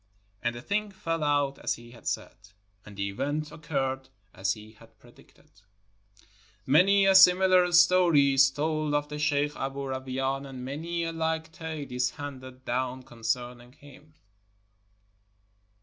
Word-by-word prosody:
And 120 0 -1
the 120 - -8
thing 210 +1 -1
fell 165 -5 -3
out 145 -2 +1
as - - -1
he 120 0 -14
had 120 - -13
said, - - -3 0.5
and 105 -1 -13
the 100 0 -1
event 145 +8 -3
occurred 135 -4 -3 0.2
as 95 +1 -1
he 110 0 -13
had 115 0 -20
predicted. 120 +2 -21 1.1
Many 195 +8 +5
a 195 - +5
similar 185 -1 +6
story 175 -5 +5
is 135 0 +6
told 155 +1 -1
of 145 0 -1
the 150 0 -6
sheikh 145 -1 +1
Aboo 135 0 -4
Ra 130 0 -2
wain, 135 +1 -3
and 130 -2 -8
many 165 +5 -3
a 165 - -2
like 160 0 -2
tale 160 -5 -7
is 125 0 0
handed 130 -3 -9
down 130 +1 -2
concerning 120 +1 -4
him. 145 +2 -17
140 Hz, 150 wpm, -28 LUFS, 130-160 Hz, 1.1 s, similar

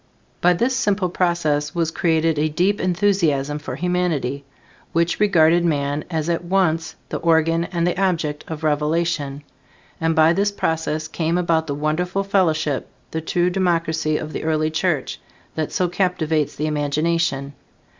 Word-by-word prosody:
By 180 +1 +5
this 240 +8 0
simple 205 -7 +1
process 155 -5 0
was 165 -2 0
created 160 -2 +1
a 155 +1 +1
deep 185 +7 +1
enthusiasm 170 -6 +1
for 150 - -6
humanity; 170 -7 -1 0.5
which 170 +1 +1
regarded 170 -4 +4
man 145 -2 0
as 160 -2 -2
at 170 0 -1
once 170 -3 0
the - - -2
organ 165 0 +2
and 170 -2 -1
the 180 +2 0
object 160 -6 0
of 160 -1 -6
revelation; 150 -1 0 0.6
and 165 0 +1
by 160 0 +5
this 200 +3 +1
process 160 -4 -2
came 165 +1 -1
about 165 -2 +1
the 140 - -2
wonderful 180 +6 -1
fellowship, 160 -8 0 0.2
the 160 - -2
true 175 +2 0
democracy 165 -4 0
of 155 0 -6
the - - -4
early 155 0 0
Church, 160 -3 -1 0.3
that 155 -1 -3
so 180 - +1
captivates 165 -5 0
the 150 - -2
imagination. 150 -1 0
165 Hz, 150 wpm, -21 LUFS, 155-180 Hz, 0.6 s, By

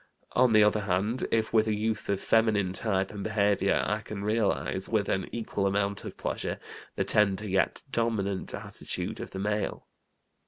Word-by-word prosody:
On 125 -1 +4
the 110 -1 +7
other 105 +1 +3
hand, 100 +5 0
if 110 -1 +1
with 110 -1 +4
a 110 - +1
youth 110 0 -2
of 100 -1 +1
feminine 105 -5 +2
type 95 -1 0
and 105 -2 -6
behavior 100 -2 +2
I 105 +1 -1
can 105 -2 -6
realize, 105 -3 0
with 105 -3 +1
an 95 - -1
equal 105 -4 -1
amount 100 0 0
of - - -7
pleasure, - - -3 0.4
the - - +1
tender, 105 0 +2
yet 95 -2 +1
dominant, 105 -5 -1
attitude - - -4
of - - -6
the - - -7
male. 105 +1 -2
105 Hz, 170 wpm, -28 LUFS, 100-110 Hz, 0.4 s, the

